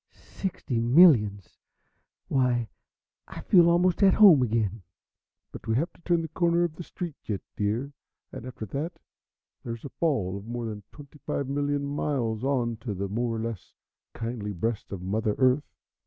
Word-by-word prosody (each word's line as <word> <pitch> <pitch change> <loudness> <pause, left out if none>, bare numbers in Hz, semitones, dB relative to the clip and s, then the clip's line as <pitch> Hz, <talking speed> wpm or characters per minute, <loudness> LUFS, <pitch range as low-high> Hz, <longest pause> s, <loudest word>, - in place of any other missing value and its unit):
"Sixty 155 -10 -4
millions! 115 - +4 0.7
Why 125 -3 +1 0.6
I - - -8
feel 175 -3 +5
almost 175 +2 +2
at 195 -2 +6
home 190 -10 +8
again." 110 -3 0 0.7
"But - - -10
we 110 - +1
have 165 +7 -1
to - - -23
turn 170 -1 +1
the - - -4
corner 170 +1 +2
of 170 -3 -1
the - - -8
street 175 -1 -6
yet, 100 -3 -3
dear, 115 +7 -2 0.4
and - - -8
after 125 -3 -7
that 145 - -4 0.7
there's 115 0 -6
a - - -5
fall 110 - -1
of 100 +2 -10
more 120 0 -4
than 105 -2 -5
twenty 145 0 -14
five 140 - -3
million 145 +1 -1
miles 130 -6 -2
on 125 -4 0
to 110 -2 -5
the 100 +1 -3
more 115 +2 -1
or - - -3
less 115 -3 -6 0.4
kindly 115 -3 -4
breast 110 +5 -3
of 95 -3 -6
Mother 105 +2 -1
Earth." 130 +2 +2
125 Hz, 170 wpm, -27 LUFS, 110-150 Hz, 0.7 s, home